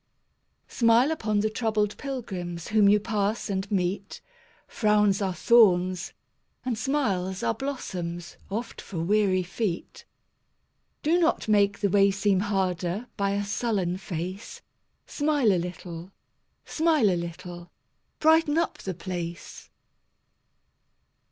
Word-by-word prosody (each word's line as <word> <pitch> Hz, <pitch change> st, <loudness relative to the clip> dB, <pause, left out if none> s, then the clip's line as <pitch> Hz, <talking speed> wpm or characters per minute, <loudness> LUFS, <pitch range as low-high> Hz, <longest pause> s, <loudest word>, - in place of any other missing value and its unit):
Smile 235 Hz, +4 st, +3 dB
upon 215 Hz, -9 st, 0 dB
the 215 Hz, -, +1 dB
troubled 215 Hz, -2 st, 0 dB
pilgrims 185 Hz, -, -5 dB
Whom 210 Hz, -2 st, +5 dB
you 210 Hz, +1 st, +5 dB
pass 210 Hz, +1 st, -1 dB
and 190 Hz, 0 st, -2 dB
meet; 195 Hz, 0 st, -2 dB, 0.5 s
Frowns 210 Hz, -2 st, +2 dB
are 190 Hz, -2 st, -1 dB
thorns, 185 Hz, -6 st, +4 dB, 0.5 s
and 250 Hz, -2 st, 0 dB
smiles 205 Hz, -7 st, -1 dB
are -, -, +1 dB
blossoms 175 Hz, -10 st, -5 dB
Oft 225 Hz, +4 st, -5 dB
for 190 Hz, -, -8 dB
weary 185 Hz, +2 st, +2 dB
feet. 185 Hz, 0 st, -4 dB, 1.0 s
Do 330 Hz, +4 st, +3 dB
not 330 Hz, -8 st, +1 dB
make 200 Hz, -1 st, +2 dB
the 200 Hz, -, +2 dB
way 200 Hz, 0 st, +5 dB
seem 200 Hz, -1 st, +1 dB
harder 190 Hz, +1 st, -1 dB
By 200 Hz, -1 st, 0 dB
a 200 Hz, 0 st, -1 dB
sullen 200 Hz, -4 st, -1 dB
face; 180 Hz, +3 st, -6 dB, 0.4 s
Smile 290 Hz, -8 st, +2 dB
a 180 Hz, -, +1 dB
little, 175 Hz, 0 st, -7 dB, 0.5 s
smile 310 Hz, -, +2 dB
a -, -, +1 dB
little, 175 Hz, 0 st, -7 dB, 0.5 s
Brighten 320 Hz, -1 st, +4 dB
up 335 Hz, -, 0 dB
the 190 Hz, -2 st, -5 dB
place. 175 Hz, -2 st, -6 dB
200 Hz, 120 wpm, -26 LUFS, 180-225 Hz, 1.0 s, Whom